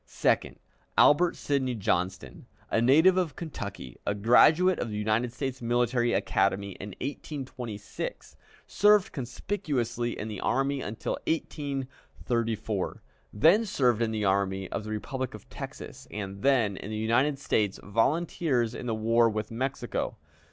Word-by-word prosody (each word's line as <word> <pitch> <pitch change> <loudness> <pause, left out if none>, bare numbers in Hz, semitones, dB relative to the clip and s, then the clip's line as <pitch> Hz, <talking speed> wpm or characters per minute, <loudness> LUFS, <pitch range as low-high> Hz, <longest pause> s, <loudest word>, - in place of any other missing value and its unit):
Second, - - 0 0.4
Albert 170 +4 +5
Sidney 130 -3 -1
Johnston, 90 - -2 0.2
a 115 - +2
native 160 +10 +5
of 180 -5 0
Kentucky, 145 - -7
a 100 - -1
graduate 155 - +5
of 120 - -2
the 105 - -4
United 110 +3 0
States 130 0 -4
Military 120 0 +1
Academy 100 -2 +1
in 95 +1 -8
1826, 130 -6 -6 0.3
served 210 -1 +4
conspicuously 125 - -3
in 110 - -4
the 105 -3 -5
army 135 +1 0
until 105 0 -4
1834, 125 - -3 0.3
then 165 - +5
served 125 - +1
in 115 - +2
the 110 -2 -1
army 95 0 +1
of - - -3
the 110 - -7
Republic 125 +3 -4
of 105 - -13
Texas, - - -8
and 100 -1 -6
then 115 -7 +2
in 100 - -7
the 110 - -3
United 120 +6 +2
States 105 -7 0
Volunteers 125 +1 +1
in 125 - -6
the 115 - 0
war 115 +1 +3
with 110 0 -4
Mexico. 130 +4 -3
120 Hz, 135 wpm, -28 LUFS, 105-140 Hz, 0.4 s, Albert